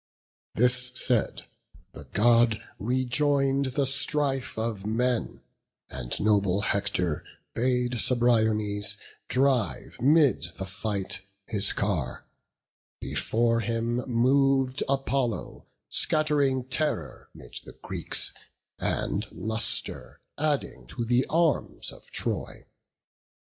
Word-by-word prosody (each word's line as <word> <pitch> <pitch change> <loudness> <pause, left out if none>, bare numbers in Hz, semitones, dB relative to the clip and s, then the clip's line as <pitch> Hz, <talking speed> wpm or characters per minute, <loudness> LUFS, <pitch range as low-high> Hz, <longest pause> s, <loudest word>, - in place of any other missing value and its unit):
This 125 +3 +3
said, 125 -3 +2 0.5
the 70 - -11
God 115 - +4 0.2
rejoin'd 135 +3 +1
the 140 - +2
strife 135 -1 0
of 110 -3 -2
men; 120 +3 -1 0.5
And - - -3
noble 100 -2 +2
Hector 100 -6 0 0.3
bade 125 0 0
Cebriones 110 -4 +2 0.3
Drive 130 -6 0
'mid 135 - +4
the 95 - -4
fight 100 0 -3 0.2
his 105 -2 0
car; 85 -12 -2 0.7
before 115 +1 +1
him 115 +1 -1
mov'd 130 +2 +2
Apollo, 135 -3 -1 0.2
scatt'ring 145 -4 +2
terror 150 +3 -2
'mid - - -8
the - - -12
Greeks, - - 0 0.5
And - - -1
lustre 110 0 -2 0.2
adding 150 -2 -1
to 120 - -4
the 120 +2 +2
arms 165 +1 +1
of - - -15
Troy. - - -3
120 Hz, 95 wpm, -27 LUFS, 105-135 Hz, 0.7 s, God